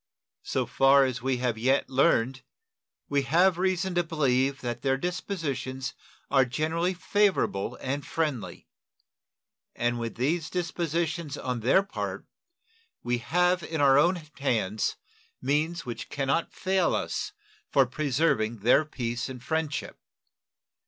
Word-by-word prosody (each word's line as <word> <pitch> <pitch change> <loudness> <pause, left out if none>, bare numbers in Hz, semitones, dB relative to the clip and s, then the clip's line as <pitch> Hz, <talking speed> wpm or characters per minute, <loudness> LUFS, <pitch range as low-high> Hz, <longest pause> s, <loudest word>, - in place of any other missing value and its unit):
So - - -1
far 135 0 +5
as 130 -2 -3
we 130 0 0
have 120 -3 -1
yet 130 +4 +2
learned, 130 -2 +2 0.7
we 145 -1 +1
have 175 +6 +3
reason 185 0 0
to 175 0 +2
believe 140 -4 +1
that 120 -1 -4
their 135 0 +1
dispositions 135 -7 -3 0.4
are 135 -1 +5
generally 160 +8 -1
favorable 185 - +1
and 140 +2 -3
friendly; 150 -9 -3 1.1
and 120 0 0
with 115 -1 -4
these 155 +6 0
dispositions 170 -3 -2
on 125 -2 -3
their 130 - +4
part, 200 - -5 0.8
we 120 0 0
have 180 +7 +2
in 160 -1 -4
our 140 -1 +6
own 175 +5 +4 0.2
hands 110 -6 0 0.4
means 155 +4 0
which 120 -2 -6
can 140 -1 -2
not 140 +5 0
fail 185 -1 +1
us 420 - -3 0.4
for 135 - +4
preserving 125 -5 0
their 125 +7 +5
peace 120 -4 -3
and 125 -2 -8
friendship. 160 0 -2
140 Hz, 130 wpm, -27 LUFS, 125-170 Hz, 1.1 s, our